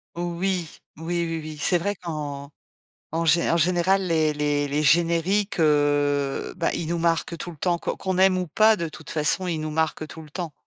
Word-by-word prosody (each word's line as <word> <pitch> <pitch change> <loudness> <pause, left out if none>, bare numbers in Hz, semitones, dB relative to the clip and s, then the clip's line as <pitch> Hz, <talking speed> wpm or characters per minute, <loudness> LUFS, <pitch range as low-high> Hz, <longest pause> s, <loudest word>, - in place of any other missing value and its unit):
Oui. 175 0 -2 0.3
Oui, 170 +2 -2
oui, 165 -1 -3
oui, 155 0 -8
c'est 175 +4 +2
vrai 200 +4 -2
qu'en 145 -4 -6 0.6
en 165 +1 0
gé 165 +2 +3
en - - +3
général, 180 +3 +2
les 160 -2 +2
les 145 -1 0
les 145 +2 -1
génériques, 170 +6 +2
heu, 145 -2 +1
bah, 170 - 0
ils 165 - -3
nous 170 0 -1
marquent 165 0 0
tout 175 - -6
le - - -14
temps. 175 +3 0
Que - - -3
qu'on 190 -1 -3
aime 190 0 +5
ou 180 -2 -2
pas, 215 +6 +5
de 170 -4 -3
toute 155 0 -11
façon, 155 +4 +1
ils 165 -3 -2
nous 155 0 -3
marquent 160 0 -1
tout 160 - -10
le 150 - -14
temps. 170 -3 -5
165 Hz, 210 wpm, -24 LUFS, 150-175 Hz, 0.6 s, aime